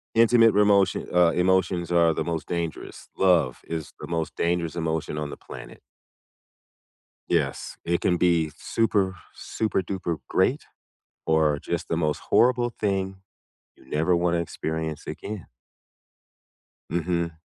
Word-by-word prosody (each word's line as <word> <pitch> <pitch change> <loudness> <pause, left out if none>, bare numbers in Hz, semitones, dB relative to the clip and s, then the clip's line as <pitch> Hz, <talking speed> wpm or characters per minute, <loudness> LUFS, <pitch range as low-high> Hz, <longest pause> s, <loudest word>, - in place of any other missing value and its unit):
intimate 115 0 +6
remotion, 100 -2 +3
uh, 90 -1 +5
emotions 90 -1 +1
are 85 -2 +4
the - - -2
most 85 -2 -3
dangerous. 85 -2 -5
Love 85 -10 +3
is 80 -2 -5
the - - -6
most 80 -2 -2
dangerous 85 -1 0
emotion 80 -2 -2
on 75 -1 -3
the - - -7
planet. - - -11 1.5
Yes. - - -1
It 85 0 0
can 90 - +2
be 85 -3 +2
super, 100 -5 0 0.2
super 110 -3 -2
duper 90 -2 -3
great - - +1 0.6
or 80 -2 +2
just - - -3
the 80 - -1
most 75 -3 0
horrible 120 0 +4
thing 95 -4 -2 0.6
you - - -20
never 80 +5 +2
wanna 85 0 +1
experience 80 -2 -4
again. 105 -4 -6 1.4
Mhm. 85 0 -1
85 Hz, 125 wpm, -25 LUFS, 80-95 Hz, 1.5 s, intimate